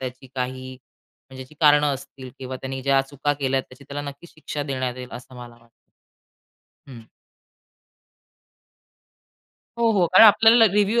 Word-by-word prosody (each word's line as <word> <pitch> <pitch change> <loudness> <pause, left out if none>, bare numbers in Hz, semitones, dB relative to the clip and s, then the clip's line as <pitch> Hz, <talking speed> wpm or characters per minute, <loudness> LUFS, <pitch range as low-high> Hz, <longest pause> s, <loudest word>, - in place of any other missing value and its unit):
त्याची 130 0 -8
काही 130 0 -5 0.6
म्हणजे 130 0 -10
जी 130 - -20
कारणं 150 -1 +4
असतील 130 -1 -11
किंवा 130 0 -7
त्याने 135 0 -6
ज्या 135 0 +2
चुका 145 +1 -1
केल्यात 135 -1 0
त्याची 130 +2 -16
त्याला 145 +2 -6
नक्कीच 155 +5 -16
शिक्षा 150 -2 -6
देण्यात 130 -3 -3
येईल 125 -1 -8
असं 130 +1 -11
मला 120 -1 -11
वाटतं. 120 0 -24 1.2
हम्म. 120 -4 -12 2.7
हो, 230 -1 +2
हो, 190 -4 +2
कारण 185 +6 +6
आपल्याला 225 +2 +6
रिव्ह्यू 210 +3 +2
135 Hz, 140 wpm, -22 LUFS, 130-150 Hz, 2.7 s, कारण